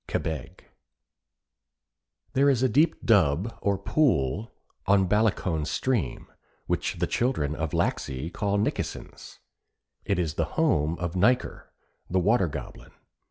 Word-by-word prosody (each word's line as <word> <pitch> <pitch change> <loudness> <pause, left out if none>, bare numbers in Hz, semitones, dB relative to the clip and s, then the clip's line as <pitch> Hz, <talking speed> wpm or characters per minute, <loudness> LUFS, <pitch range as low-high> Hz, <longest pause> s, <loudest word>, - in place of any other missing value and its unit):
KEBEG 80 +2 -4 1.7
There 140 +2 +4
is 130 -2 +2
a - - +5
deep 155 +5 +2
dub, 95 - +3
or 100 -1 +1
pool, 105 - +1 0.4
on 95 -1 +4
Ballacoan 100 -6 +1
stream, 110 - -1 0.4
which - - -1
the - - +1
children 115 - 0
of 80 -1 -3
Laxey 80 -3 -2
call 100 +2 -1
Nikkesen's. 105 - -4 0.7
It 100 - 0
is 85 -4 -1
the 80 - 0
home 85 - +2
of 85 -1 -3
Nyker, 120 +7 +1 0.4
the 95 - 0
Water 95 +1 +3
Goblin. 75 - -8
95 Hz, 120 wpm, -26 LUFS, 80-115 Hz, 1.7 s, a